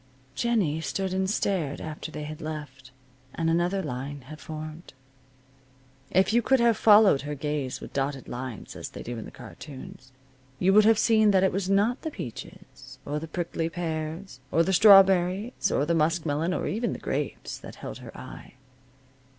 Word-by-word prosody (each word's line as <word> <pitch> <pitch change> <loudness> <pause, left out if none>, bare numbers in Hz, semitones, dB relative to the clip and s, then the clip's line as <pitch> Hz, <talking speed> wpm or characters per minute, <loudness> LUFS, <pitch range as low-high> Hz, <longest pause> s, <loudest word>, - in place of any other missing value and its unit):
Jennie 180 - 0
stood 190 +3 -2
and 190 0 0
stared 180 -8 -1
after 155 0 -6
they 150 -1 -6
had 155 +2 -7
left, 145 -4 -7 0.5
and 165 0 0
another 175 +3 +1
line 140 0 -5
had 155 +5 -11
formed. 155 0 -8 1.1
If 190 +4 +3
you 240 - +4
could 265 +3 +3
have 235 -1 +4
followed 210 -8 +6
her 145 +1 -5
gaze 145 -2 -3
with - - -10
dotted 135 -1 -2
lines, 125 -2 -7
as - - -6
they - - -9
do 120 -1 -5
in - - -7
the - - -9
cartoons, 130 -2 -11 0.5
you 190 +5 +3
would 210 +1 +7
have 225 0 +5
seen 220 -1 +4
that 190 -2 +4
it 190 - +3
was 195 0 -2
not 210 +6 +2
the 315 - -3
peaches, 130 - -10
or 150 +1 -2
the 160 - -7
prickly 165 -1 -3
pears, 160 -2 -5
or 165 +3 +4
the 190 - 0
strawberries, 195 +2 +5
or 140 - +1
the 170 - +1
muskmelon 160 0 +1
or - - -2
even 225 +2 -1
the - - -5
grapes, 145 0 -4
that - - -10
held - - -8
her - - -11
eye. - - -11
165 Hz, 175 wpm, -27 LUFS, 145-195 Hz, 1.1 s, would